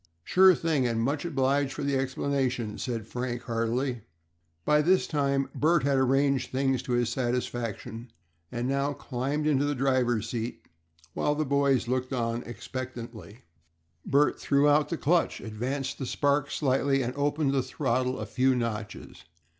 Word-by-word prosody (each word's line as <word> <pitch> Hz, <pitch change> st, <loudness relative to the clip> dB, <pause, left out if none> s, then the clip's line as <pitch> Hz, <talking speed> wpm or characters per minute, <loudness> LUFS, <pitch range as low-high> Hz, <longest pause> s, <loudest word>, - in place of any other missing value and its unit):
"Sure 185 Hz, -, +6 dB
thing, 155 Hz, -7 st, +1 dB
and 115 Hz, -1 st, -1 dB
much 145 Hz, +6 st, -1 dB
obliged 140 Hz, -2 st, +1 dB
for -, -, -5 dB
the 140 Hz, 0 st, 0 dB
explanation," 130 Hz, -4 st, -1 dB
said 115 Hz, -5 st, -3 dB
Frank, 120 Hz, +1 st, -4 dB
heartily. 120 Hz, +2 st, -1 dB, 0.6 s
By 150 Hz, 0 st, +4 dB
this 185 Hz, +4 st, +3 dB
time 140 Hz, -2 st, 0 dB
Bert 160 Hz, -1 st, +2 dB
had 140 Hz, -1 st, +2 dB
arranged 135 Hz, +1 st, +2 dB
things 135 Hz, -1 st, 0 dB
to 125 Hz, -1 st, -3 dB
his 120 Hz, -1 st, +2 dB
satisfaction, 120 Hz, -2 st, -3 dB, 0.4 s
and 120 Hz, +1 st, -2 dB
now 140 Hz, +1 st, 0 dB
climbed 140 Hz, +3 st, -3 dB
into 145 Hz, -2 st, +2 dB
the 145 Hz, 0 st, 0 dB
driver's 125 Hz, -4 st, +1 dB
seat, 120 Hz, 0 st, -4 dB, 0.5 s
while 150 Hz, -, 0 dB
the 155 Hz, +1 st, 0 dB
boys 140 Hz, -3 st, +2 dB
looked 130 Hz, +1 st, -1 dB
on 115 Hz, -1 st, -1 dB
expectantly. 120 Hz, -1 st, -7 dB, 0.6 s
Bert 145 Hz, +2 st, +2 dB
threw 140 Hz, +1 st, +3 dB
out 145 Hz, +1 st, +4 dB
the 170 Hz, -, -2 dB
clutch, 170 Hz, +4 st, +1 dB
advanced 130 Hz, +5 st, -4 dB
the 135 Hz, -, -3 dB
spark 145 Hz, +1 st, +1 dB
slightly, 135 Hz, -1 st, +1 dB
and 120 Hz, +1 st, -3 dB
opened 145 Hz, 0 st, +1 dB
the 135 Hz, -, +2 dB
throttle 130 Hz, -1 st, -1 dB
a 110 Hz, -, -4 dB
few 130 Hz, +4 st, +2 dB
notches. 105 Hz, -6 st, -5 dB
130 Hz, 155 wpm, -28 LUFS, 120-140 Hz, 0.6 s, Sure